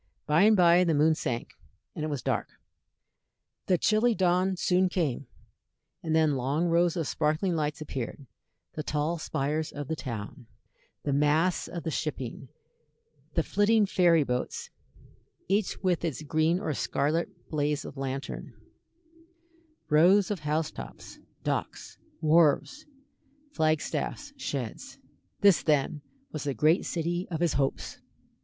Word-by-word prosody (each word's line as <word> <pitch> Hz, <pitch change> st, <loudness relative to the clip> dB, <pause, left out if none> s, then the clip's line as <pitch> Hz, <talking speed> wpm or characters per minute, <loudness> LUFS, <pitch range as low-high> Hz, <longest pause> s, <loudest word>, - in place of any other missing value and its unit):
By 155 Hz, +3 st, +3 dB
and 215 Hz, -1 st, +5 dB
by 175 Hz, 0 st, +6 dB
the 165 Hz, -3 st, +2 dB
moon 155 Hz, +2 st, +4 dB
sank, 120 Hz, -6 st, -3 dB, 0.4 s
and 155 Hz, -, -5 dB
it -, -, -1 dB
was 145 Hz, -4 st, -4 dB
dark; -, -, -1 dB, 1.2 s
the 185 Hz, -, +3 dB
chilly 220 Hz, +5 st, +2 dB
dawn 185 Hz, 0 st, +2 dB
soon 180 Hz, +1 st, +2 dB
came, 145 Hz, -8 st, -1 dB, 0.7 s
and 160 Hz, -1 st, -1 dB
then 160 Hz, -1 st, +4 dB
long 140 Hz, +6 st, 0 dB
rows 170 Hz, +1 st, +2 dB
of 160 Hz, -4 st, -1 dB
sparkling 155 Hz, +5 st, 0 dB
lights 150 Hz, -1 st, -2 dB
appeared; 135 Hz, -1 st, -5 dB, 0.5 s
the 155 Hz, -, -4 dB
tall 155 Hz, +3 st, -1 dB
spires 150 Hz, +2 st, -2 dB
of 145 Hz, -2 st, -6 dB
the 160 Hz, -, -2 dB
town; 115 Hz, -4 st, -7 dB, 0.6 s
the 145 Hz, -, -1 dB
masts 150 Hz, +5 st, +2 dB
of 170 Hz, -, -6 dB
the 160 Hz, -, -2 dB
shipping; 135 Hz, -4 st, -4 dB, 0.9 s
the 165 Hz, -, +2 dB
flitting 205 Hz, +4 st, +3 dB
ferry 175 Hz, -5 st, +4 dB
boats, 125 Hz, -2 st, -3 dB, 0.8 s
each 200 Hz, +2 st, 0 dB
with 180 Hz, -3 st, +1 dB
its 155 Hz, -3 st, -3 dB
green 155 Hz, +3 st, +1 dB
or 160 Hz, -7 st, -2 dB
scarlet 150 Hz, +6 st, 0 dB, 0.2 s
blaze 150 Hz, -1 st, 0 dB
of -, -, -8 dB
lantern; 135 Hz, 0 st, -5 dB, 1.3 s
rows 180 Hz, +7 st, +5 dB
of 200 Hz, -, -2 dB
house 150 Hz, +1 st, -1 dB
tops; -, -, -10 dB, 0.2 s
docks; -, -, -3 dB, 0.2 s
wharves; 165 Hz, -, +3 dB, 0.7 s
flag 155 Hz, -1 st, +2 dB
staffs; 290 Hz, -, -4 dB
sheds. 140 Hz, -, -5 dB, 0.4 s
This, 200 Hz, -4 st, +6 dB
then, 150 Hz, 0 st, +1 dB, 0.3 s
was 155 Hz, -2 st, -5 dB
the 140 Hz, -2 st, -1 dB
great 155 Hz, +3 st, +3 dB
city 175 Hz, +2 st, -2 dB
of 165 Hz, -3 st, -3 dB
his 170 Hz, -3 st, +1 dB
hopes. 135 Hz, 0 st, -2 dB
160 Hz, 135 wpm, -28 LUFS, 145-175 Hz, 1.3 s, by